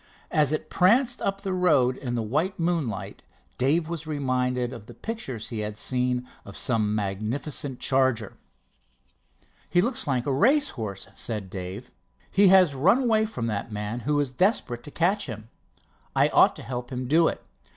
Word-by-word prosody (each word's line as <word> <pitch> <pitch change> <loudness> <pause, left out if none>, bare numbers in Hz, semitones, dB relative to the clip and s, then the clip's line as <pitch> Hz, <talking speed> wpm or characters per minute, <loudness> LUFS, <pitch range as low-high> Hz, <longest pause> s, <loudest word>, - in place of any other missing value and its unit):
As 150 -2 +3
it 155 - -3
pranced 240 +7 +3
up 195 0 -1
the 195 -2 -2
road 150 -9 +3
in 125 -2 -4
the 115 - -1
white 155 - -1
moonlight, 165 - -2 0.4
Dave 155 +6 +2
was 165 -2 -5
reminded 125 -4 -1
of 115 -4 -10
pictures 220 - -5
he 115 - -4
had 105 0 -4
seen 125 +2 -1 0.2
of 100 - -9
some 110 -4 +1
magnificent 115 +7 -3
charger. 130 -5 +1 1.4
"He 175 - +3
looks 240 - 0
like 130 -3 0
a 140 - 0
race 275 - +4
horse," 100 -5 -5
said 105 -5 -5
Dave. 95 +5 -7 0.4
"He 200 +1 +5
has 185 -5 +6
run 170 - +4
away 220 -2 +2
from 125 - -4
that 110 0 -3
man, 105 +3 -4
who 145 +4 0
is 140 -3 -1
desperate 130 - 0
to - - -8
catch 180 +6 +1
him. 110 -2 -8 0.7
I - - +4
ought - - +5
to - - -9
help 125 -1 -5
him 125 0 -3
do 165 +5 +4
it. - - -4
130 Hz, 170 wpm, -26 LUFS, 115-175 Hz, 1.4 s, has